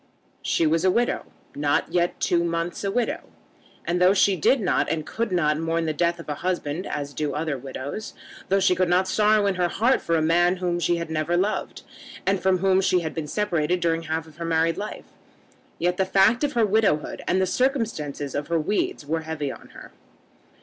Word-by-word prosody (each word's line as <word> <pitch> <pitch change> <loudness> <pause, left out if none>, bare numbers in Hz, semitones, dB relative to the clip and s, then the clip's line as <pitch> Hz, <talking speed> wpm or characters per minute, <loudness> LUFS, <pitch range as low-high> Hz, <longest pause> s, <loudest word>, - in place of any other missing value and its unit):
She 165 - +1
was 165 +2 +2
a 190 - +4
widow, 240 +6 0 0.3
not 145 0 0
yet 175 0 +1
two 170 -1 +1
months 170 +2 -2
a 200 - 0
widow; 235 +3 -1 0.7
and 175 +1 0
though 185 +2 +5
she 195 0 +4
did 220 - +3
not 195 - +1
and 155 -2 -2
could 230 +2 -3
not 155 -4 +1
mourn 165 0 -1
the 155 - -1
death 170 +2 0
of 165 - -10
a 150 - -2
husband 175 +1 -3
as 145 -1 -4
do 145 -2 -2
other 155 -1 -1
widows, 135 - -6 0.3
though 195 +1 +3
she 190 -1 +3
could 180 0 +1
not 185 +2 +3
sorrow 210 +1 +3
in 200 - +2
her 175 - +3
heart 235 +9 +2
for 165 - 0
a 160 - +2
man 175 +3 +3
whom 175 -1 -1
she 175 +1 +1
had 170 -1 -4
never 160 +2 0
loved, 200 +4 -2 0.4
and 195 -1 +1
from 190 -1 +3
whom 190 +1 +3
she 185 -2 +2
had 160 -2 -4
been 160 -2 -4
separated 180 -2 0
during 165 -1 0
half 160 0 -3
her 170 - -5
married 165 +1 +1
life, 210 +1 -6 0.7
yet 180 +1 0
the 190 - +3
fact 195 +7 +3
of 290 0 0
her 235 -3 +3
widowhood 205 -7 +1
and 185 - +2
the 190 - +3
circumstances 200 - -1
of 145 +1 -3
her 170 -1 +1
weeds 155 -2 -1
were 160 +2 -1
heavy 155 -3 -4
on - - -12
her. - - -11
175 Hz, 210 wpm, -24 LUFS, 160-195 Hz, 0.7 s, though